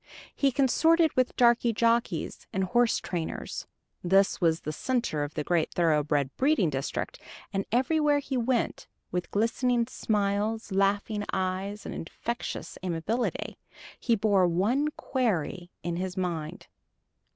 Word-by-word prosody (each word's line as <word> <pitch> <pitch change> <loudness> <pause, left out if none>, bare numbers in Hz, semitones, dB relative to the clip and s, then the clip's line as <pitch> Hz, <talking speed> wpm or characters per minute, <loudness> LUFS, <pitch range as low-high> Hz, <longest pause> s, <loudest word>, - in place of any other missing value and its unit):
He 275 -1 +2
consorted 320 +5 +3
with 255 -1 +1
darky 240 -1 +4
jockeys 230 -6 0
and 190 - 0
horse 240 +5 +3
trainers 170 -3 -4 0.4
this 195 +3 +3
was 165 -1 +2
the 155 - -4
center 235 - -1
of 145 +1 -6
the 150 - -1
great 170 0 +1
thoroughbred 150 -4 +1
breeding 265 - +3
district 135 0 -3 0.3
and 195 0 -1
everywhere 290 +4 +3
he 280 -1 -3
went, 245 -1 0 0.2
with 180 0 -2
glistening 235 +3 +1
smiles, 210 -1 -1
laughing 200 +2 +1
eyes, 190 +2 -2
and - - -5
infectious 235 +8 -5
amiability, 185 +7 -2 0.4
he 235 - +2
bore 200 -3 +3
one 215 - +1
query 185 - -1
in 170 0 -2
his 185 +1 -4
mind. 175 0 -3
200 Hz, 130 wpm, -28 LUFS, 175-240 Hz, 0.4 s, darky